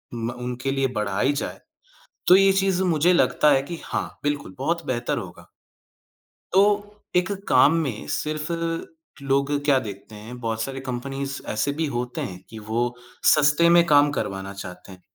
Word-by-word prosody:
म 115 +1 -3
उनके 125 +2 -3
लिए 135 -1 +1
बढ़ाई 105 +6 +1
जाए, 145 - -4 0.7
तो 180 - +9
ये 195 0 +6
चीज़ 190 -1 +1
मुझे 175 0 +3
लगता 150 -3 +3
है 135 -1 +4
कि 165 +3 -7
हाँ, - - -4
बिल्कुल, 145 -10 -2
बहुत 170 0 -1
बेहतर 120 -1 -1
होगा। - - -8 1.0
तो 190 +2 +6 0.5
एक 180 +3 +2 0.2
काम 130 +3 +6
में 125 -8 -4
सिर्फ़ 155 +2 -2 0.7
लोग 140 +1 +1
क्या 140 -3 +4
देखते 105 -2 -8
हैं, 110 +4 -9
बहुत 110 -1 -2
सारे 135 +2 -4
कंपनीज़ 135 +2 -4
ऐसे 110 +7 0
भी 160 +2 -1
होते 125 0 -3
हैं 90 -2 -5
कि 110 - -9
वो 115 +2 0 0.5
सस्ते 150 +3 +4
में 170 - +6
काम 145 -2 +5
करवाना 95 0 -5
चाहते 90 -1 -9
हैं। 90 - -14
135 Hz, 160 wpm, -24 LUFS, 115-155 Hz, 1.0 s, तो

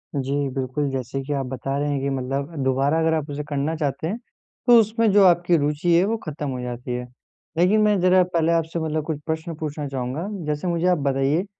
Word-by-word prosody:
जी, 135 0 -1 0.2
बिल्कुल, 135 +2 -2
जैसे 135 +1 -3
कि 145 +2 -3
आप 135 -2 -1
बता 135 +2 -3
रहे 145 0 0
हैं 140 -1 0
कि 140 - -1
मतलब 135 +4 -3
दोबारा 135 +4 +2
अगर 160 0 +2
आप 155 -2 -2
उसे 145 +1 -4
करना 145 +3 -1
चाहते 150 0 -2
हैं 210 +6 -2 0.5
तो 240 -1 +8
उसमें 220 0 +2
जो 200 0 +6
आपकी 175 -1 +4
रुचि 150 +4 +1
है 180 - +4
वो 225 +2 0
ख़त्म 150 -2 -5
हो 130 -1 -4
जाती 125 0 -5
है। 125 0 -3 0.5
लेकिन 195 +5 +4
मैं 210 -2 +3
ज़रा 185 0 +5
पहले 165 0 +2
आपसे 165 0 0
मतलब 155 -1 -1
कुछ 155 -3 -3
प्रश्न 160 0 -3
पूछना 150 -1 -4
चाहूँगा? 135 +6 -3 0.2
जैसे 150 +4 -2
मुझे 170 +1 +1
आप 180 -2 +4
बताइए 140 +5 +1
150 Hz, 215 wpm, -23 LUFS, 135-170 Hz, 0.5 s, तो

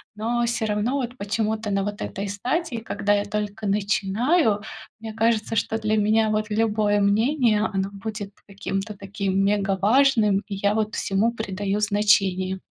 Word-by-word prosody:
но 235 +3 0
всё 235 -1 -1
равно 210 +4 0
вот 255 -2 -3
почему-то 215 0 -2
на 195 0 +1
вот 205 +1 -5
этой 200 +1 -4
стадии, 250 - -2
когда 205 -2 -1
я 205 0 +1
только 210 +1 -4
начинаю, 210 - +1 0.4
мне 225 -1 -6
кажется, 225 0 0
что 220 +2 0
для 215 0 0
меня, 215 +1 +3
вот, 215 0 0
любое 210 -1 +1
мнение, 220 +1 +2
оно 195 0 -1
будет 205 0 -6 0.2
каким-то 195 +1 -4
таким 195 -1 -1
мегаважным, 205 +3 +3
и 200 - -4
я, 200 +1 +1
вот, 215 0 -1
всему 205 +4 0
придаю 205 -2 -3
значение. 195 -3 +2
210 Hz, 150 wpm, -24 LUFS, 200-225 Hz, 0.4 s, меня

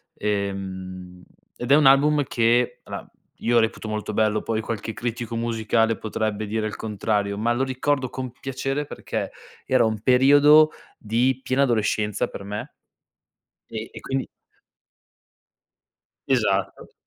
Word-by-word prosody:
ehm, 95 -3 -4 0.3
ed 125 +2 -4
è - - +9
un 150 -2 +4
album 145 +2 +5
che 120 -1 +1
alla, - - -8 0.3
io 120 0 +2
reputo 110 -1 -1
molto 110 0 -3
bello, 110 -1 +2
poi 110 -1 -2
qualche 110 0 -4
critico 120 0 -4
musicale 115 -1 +1
potrebbe 110 -1 -2
dire 110 +1 -1
il 105 - -6
contrario, 105 -1 -1
ma 115 +3 +1
lo 120 +3 +1
ricordo 130 +1 0
con 130 -1 -5
piacere 135 +3 -3
perché - - -5 0.3
era 130 -2 +3
un 110 -1 -1
periodo 145 +5 +6 0.3
di 125 +4 0
piena 135 +2 +2
adolescenza 105 -4 0
per - - -8
me. 105 +1 -6 0.9
E 110 0 -6
e - - -9
quindi 135 0 -3 2.0
Esatto. 100 -7 0
115 Hz, 130 wpm, -24 LUFS, 105-130 Hz, 2.0 s, è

